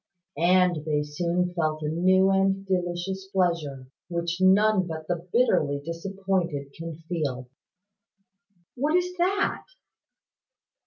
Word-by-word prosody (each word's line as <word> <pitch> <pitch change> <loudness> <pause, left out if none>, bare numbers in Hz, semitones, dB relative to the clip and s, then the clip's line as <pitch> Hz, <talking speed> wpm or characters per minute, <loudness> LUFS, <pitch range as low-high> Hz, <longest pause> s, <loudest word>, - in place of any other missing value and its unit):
And 180 -2 +3
they 150 -1 0
soon 175 +4 -1
felt 155 -2 -1
a - - -1
new 185 +4 +3
and 195 0 +1
delicious 185 +1 -2
pleasure, 170 -8 -1 0.2
which 170 +1 -2
none 190 0 +4
but 160 -1 -6
the 175 - 0
bitterly 150 - +2
disappointed 170 -4 -3
can 165 -1 -6
feel." 135 -8 -3 1.2
"What 290 +6 0
is 360 0 0
that?" 385 +3 0
175 Hz, 110 wpm, -26 LUFS, 160-195 Hz, 1.2 s, none